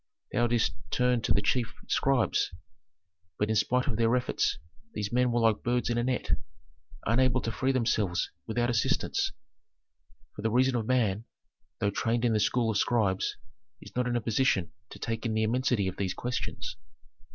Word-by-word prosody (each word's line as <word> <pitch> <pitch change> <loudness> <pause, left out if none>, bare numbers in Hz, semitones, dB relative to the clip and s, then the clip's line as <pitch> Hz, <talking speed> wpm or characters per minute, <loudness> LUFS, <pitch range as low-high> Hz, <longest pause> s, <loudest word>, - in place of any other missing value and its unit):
Thou 120 - +2
didst 120 -1 +1 0.2
turn 125 0 +2
to - - -1
the 100 - +3
chief 115 +3 0
scribes, 135 -4 +2 0.9
but 105 - 0
in - - +1
spite 125 +5 +2
of 125 -8 -1
their 115 +1 +3
efforts 125 - 0 0.4
these 105 -1 -2
men 125 0 +3
were 120 0 +1
like 110 -2 +3
birds 120 0 0
in 120 - +1
a - - 0
net, 125 0 -1 0.7
unable 125 +2 +3
to 115 - -2
free 130 +3 0
themselves 110 -7 0 0.2
without 120 +2 0
assistance, 115 -3 +1 1.0
for - - -6
the 110 - +1
reason 125 +3 +3
of 115 -2 -1
man, 115 -4 +1 0.5
though 100 - 0
trained 115 +3 0
in 115 - +3
the 110 - +2
school 115 +2 +2
of 105 - +1
scribes, 100 -6 +1 0.4
is - - -13
not 125 0 +1
in 120 - 0
a 120 - +1
position 110 -6 +1 0.2
to - - -10
take 115 -1 -3
in 115 -3 -1
the 110 - +2
immensity 120 -3 +1
of 95 - -4
these 95 -2 -1
questions. 120 -1 -4
115 Hz, 180 wpm, -29 LUFS, 110-125 Hz, 1.0 s, the